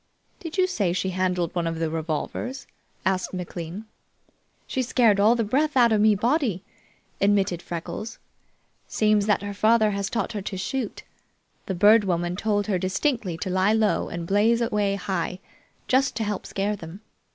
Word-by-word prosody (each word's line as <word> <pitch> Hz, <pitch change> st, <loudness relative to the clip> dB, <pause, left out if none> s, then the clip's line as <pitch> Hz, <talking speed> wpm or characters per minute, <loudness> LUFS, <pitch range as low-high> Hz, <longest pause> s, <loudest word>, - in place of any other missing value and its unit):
"Did 330 Hz, +1 st, -7 dB
you 370 Hz, -, +4 dB
say 205 Hz, -, 0 dB
she 190 Hz, +1 st, -1 dB
handled 180 Hz, -2 st, -1 dB
one 170 Hz, -2 st, -1 dB
of 165 Hz, 0 st, -3 dB
the 165 Hz, 0 st, -1 dB
revolvers?" 165 Hz, -, -4 dB, 0.4 s
asked 185 Hz, 0 st, 0 dB
McLean. 180 Hz, +2 st, -6 dB, 0.8 s
"She 260 Hz, -, -2 dB
scared 230 Hz, -4 st, +3 dB
all 215 Hz, +4 st, +5 dB
the 230 Hz, -, 0 dB
breath 280 Hz, +7 st, +1 dB
out 240 Hz, -2 st, +5 dB
of 215 Hz, -1 st, +3 dB
me 215 Hz, -1 st, +5 dB
body," 235 Hz, -, 0 dB, 0.6 s
admitted 195 Hz, -3 st, +2 dB
Freckles. 175 Hz, +6 st, -6 dB, 0.7 s
"Seems 210 Hz, -1 st, +2 dB
that 210 Hz, -1 st, +2 dB
her 205 Hz, 0 st, -4 dB
father 215 Hz, +1 st, +3 dB
has 200 Hz, -1 st, -2 dB
taught 235 Hz, -, -2 dB
her 210 Hz, -3 st, -4 dB
to 190 Hz, 0 st, -5 dB
shoot. 240 Hz, +4 st, -4 dB, 0.6 s
The 190 Hz, -, -2 dB
Bird 210 Hz, +4 st, +6 dB
Woman 175 Hz, -2 st, -1 dB
told 205 Hz, +1 st, 0 dB
her 195 Hz, -4 st, 0 dB
distinctly 190 Hz, -, -1 dB
to 185 Hz, -, -3 dB
lie 190 Hz, +3 st, +3 dB
low 220 Hz, -2 st, +1 dB
and 170 Hz, -1 st, -5 dB
blaze 210 Hz, +5 st, +3 dB
away 210 Hz, -4 st, 0 dB
high, 185 Hz, -2 st, -3 dB, 0.5 s
just 265 Hz, 0 st, +2 dB
to 225 Hz, -, -1 dB
help 210 Hz, -2 st, -3 dB
scare 200 Hz, +2 st, -1 dB
them. 175 Hz, +1 st, -10 dB
205 Hz, 170 wpm, -25 LUFS, 185-225 Hz, 0.8 s, Bird